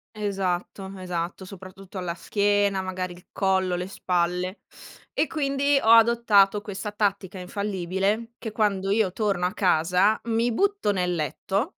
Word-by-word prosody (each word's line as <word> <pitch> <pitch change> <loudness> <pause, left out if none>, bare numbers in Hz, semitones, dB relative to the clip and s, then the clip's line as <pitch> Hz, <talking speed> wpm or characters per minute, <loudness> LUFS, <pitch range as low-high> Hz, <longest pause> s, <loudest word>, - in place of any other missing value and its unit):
Esatto, 195 -1 -3
esatto, 180 0 -4
soprattutto 190 0 -11
alla 175 -2 -3
schiena, 200 +1 +1
magari 185 -1 -4
il 180 - -16
collo, 190 -2 +1
le 180 +1 -3
spalle 180 0 -1 0.5
e 310 - +1
quindi 280 -2 +1
ho 220 - +1
adottato 225 -3 +5
questa 205 0 -5
tattica 200 -2 -1
infallibile 195 +3 -2
che 220 - -6
quando 200 -3 0
io 205 -3 +2
torno 195 -4 0
a 185 - -6
casa, 185 +2 +2
mi 230 +1 +1
butto 400 - +1
nel 180 -2 0
letto, 195 - -2
195 Hz, 140 wpm, -25 LUFS, 185-215 Hz, 0.5 s, adottato